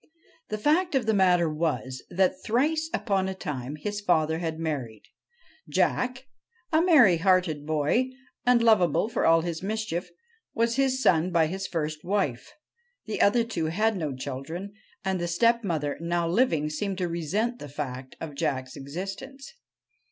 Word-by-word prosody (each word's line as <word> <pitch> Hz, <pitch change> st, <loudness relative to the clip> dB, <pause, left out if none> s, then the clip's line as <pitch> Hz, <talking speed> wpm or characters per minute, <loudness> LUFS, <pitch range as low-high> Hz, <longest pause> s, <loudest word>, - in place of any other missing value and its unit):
The 215 Hz, -, -2 dB
fact 310 Hz, -, +2 dB
of 260 Hz, -4 st, +2 dB
the 220 Hz, -, +2 dB
matter 180 Hz, -4 st, +4 dB
was, 150 Hz, -5 st, -2 dB
that 185 Hz, +1 st, +1 dB
thrice 310 Hz, +8 st, +1 dB
upon 195 Hz, -, 0 dB
a 190 Hz, -, -4 dB
time 140 Hz, -5 st, -5 dB
his 205 Hz, +7 st, -4 dB
father 160 Hz, -4 st, +2 dB
had 165 Hz, -2 st, -3 dB
married. 140 Hz, -10 st, -4 dB, 0.7 s
Jack, 255 Hz, +1 st, 0 dB, 0.5 s
a 315 Hz, -, +5 dB
merry 285 Hz, -, +6 dB
hearted 175 Hz, -4 st, +2 dB
boy, 155 Hz, -, +1 dB, 0.3 s
and 245 Hz, -1 st, +4 dB
lovable 215 Hz, -3 st, +4 dB
for 235 Hz, -, +1 dB
all 165 Hz, 0 st, +5 dB
his 165 Hz, -1 st, -4 dB
mischief, 210 Hz, -3 st, -3 dB, 0.5 s
was 230 Hz, +1 st, +1 dB
his 265 Hz, -1 st, +1 dB
son 170 Hz, +1 st, +4 dB
by 165 Hz, -2 st, +4 dB
his 190 Hz, +4 st, -4 dB
first 155 Hz, -2 st, -3 dB
wife. 185 Hz, -11 st, -1 dB, 0.5 s
The 215 Hz, -, -2 dB
other 230 Hz, +4 st, +4 dB
two 225 Hz, -8 st, -3 dB
had 215 Hz, +7 st, +1 dB
no 155 Hz, -7 st, -3 dB
children, 160 Hz, +10 st, -6 dB, 0.3 s
and 190 Hz, -2 st, 0 dB
the 175 Hz, -, -1 dB
stepmother 170 Hz, -6 st, +1 dB
now 170 Hz, 0 st, 0 dB
living 165 Hz, -, +1 dB
seemed 195 Hz, +5 st, -3 dB
to 180 Hz, -2 st, -1 dB
resent 195 Hz, +9 st, -1 dB
the 145 Hz, -, -8 dB
fact 130 Hz, -2 st, -6 dB
of 160 Hz, -2 st, -6 dB
Jack's 135 Hz, -4 st, -2 dB
existence. 195 Hz, -, -7 dB
180 Hz, 155 wpm, -27 LUFS, 155-220 Hz, 0.7 s, merry